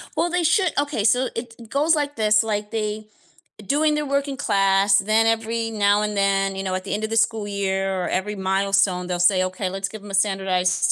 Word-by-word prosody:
Well, 330 +3 +1
they 355 0 0
should 365 +1 +2
okay, 285 -7 -1
so 250 +5 +3
it 230 0 -6
goes 300 +5 +2
like 290 -1 -2
this, 215 -1 +3
like, 210 -1 -3
they 215 -1 -3 0.6
doing 300 +5 +1
their 300 0 -2
work 280 0 -1
in 275 - -4
class, 195 -2 +3
then 215 +3 +2
every 225 0 -1
now 205 -1 +2
and 210 0 -3
then, 195 0 +1
you 195 - -4
know, 185 -1 -2
at 185 - -4
the 195 - -4
end 210 +1 -3
of - - -6
the 225 - -2
school 225 -2 +1
year 195 -2 -2
or - - -2
every 205 +3 -2
milestone, 195 -1 0
they'll 180 -1 -3
say, 185 +1 +4
"Okay, 185 +1 -3
let's 195 +1 -4
give 210 0 -10
'em 205 - -10
a - - -9
standardized 190 -2 +1
210 Hz, 225 wpm, -22 LUFS, 195-230 Hz, 0.6 s, say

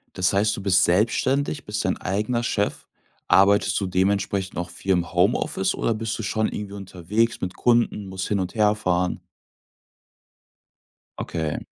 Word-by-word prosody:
Das 95 +1 +1
heißt, 105 +2 +2
du - - -5
bist 95 -2 +4
selbstständig, 130 - +1
bist 105 -1 -3
dein 95 - 0
eigener 110 +5 -1
Chef. 105 -3 -2 0.4
Arbeitest 100 +2 +4
du 100 - -2
dementsprechend 95 +1 0
auch 85 0 -3
viel 95 +2 -3
im 85 -1 -1
Homeoffice, 125 - +1
oder 115 - 0
bist 110 0 -3
du 115 - -5
schon 110 +1 0
irgendwie 100 -1 -6
unterwegs 100 +4 -2
mit 90 0 -4
Kunden, 120 -4 +1
musst 95 -1 -4
hin 100 -2 0
und 95 +4 -4
herfahren? 105 -4 +1 2.0
Okay. 80 -3 -3
100 Hz, 150 wpm, -23 LUFS, 95-110 Hz, 2.0 s, bist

